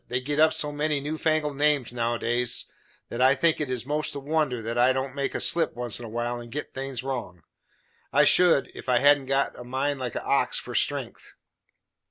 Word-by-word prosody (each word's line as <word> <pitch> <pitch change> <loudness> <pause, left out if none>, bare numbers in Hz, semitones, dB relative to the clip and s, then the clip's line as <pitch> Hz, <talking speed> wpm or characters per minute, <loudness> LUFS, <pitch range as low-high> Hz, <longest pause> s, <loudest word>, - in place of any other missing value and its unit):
They 125 - -1
git 145 +3 -3
up 155 0 +6
so 150 - -1
many 150 0 -1
new 150 +3 -4
fangled 155 -3 0
names 145 -4 +1
nowadays, 120 0 0 0.4
that 120 - -4
I 130 +2 +5
think 155 +3 +2
it 145 - -2
is 125 -2 -3
most 150 +1 -1
a - - -3
wonder 145 -3 -1
that 115 +1 -4
I 125 +2 +4
don't 130 0 -3
make 140 0 -3
a - - -1
slip 170 -7 +3
once 120 -2 -3
in 120 - -8
a - - -8
while 120 +2 -3
and 120 -1 -11
git 150 +4 -6
things 135 -2 -5
wrong. 120 - -5 0.7
I - - +4
should, 175 -6 +4
if - - -8
I 125 - +4
hadn't 140 +1 +4
got 135 +1 0
a - - -7
mind 135 +3 -2
like 125 -3 -4
a - - -4
ox - - +1
for - - -6
strength. - - -3
135 Hz, 220 wpm, -26 LUFS, 120-145 Hz, 0.7 s, up